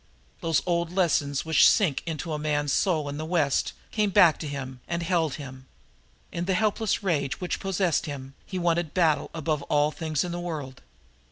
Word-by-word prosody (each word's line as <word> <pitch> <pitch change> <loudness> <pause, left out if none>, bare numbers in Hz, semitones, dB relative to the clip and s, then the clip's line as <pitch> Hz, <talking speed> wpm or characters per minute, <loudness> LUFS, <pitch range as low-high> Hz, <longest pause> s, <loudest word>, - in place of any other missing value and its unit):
Those 165 -3 +1
old 170 -1 0
lessons 155 -7 +1
which 160 -2 +6
sink 175 - +2
into 160 0 -3
a 150 - -2
man's 145 -2 0
soul 160 -6 +1
in 145 0 -4
the 155 - -4
West 160 -4 +1 0.2
came 210 -2 +1
back 170 -4 +5
to 155 - -5
him 130 -3 -6
and 170 0 -2
held 165 -4 +1
him. 130 -2 -9 0.6
In 170 - -3
the 190 0 +1
helpless 215 +1 0
rage 145 -8 0
which 180 - -3
possessed 185 -6 0
him 135 -2 -7
he 185 - -6
wanted 170 -2 0
battle 165 -5 +2
above 155 -2 -2
all 150 0 +3
things 155 -3 -2
in 175 - -4
the 175 - -3
world. 150 -7 -5
160 Hz, 185 wpm, -26 LUFS, 145-175 Hz, 0.6 s, which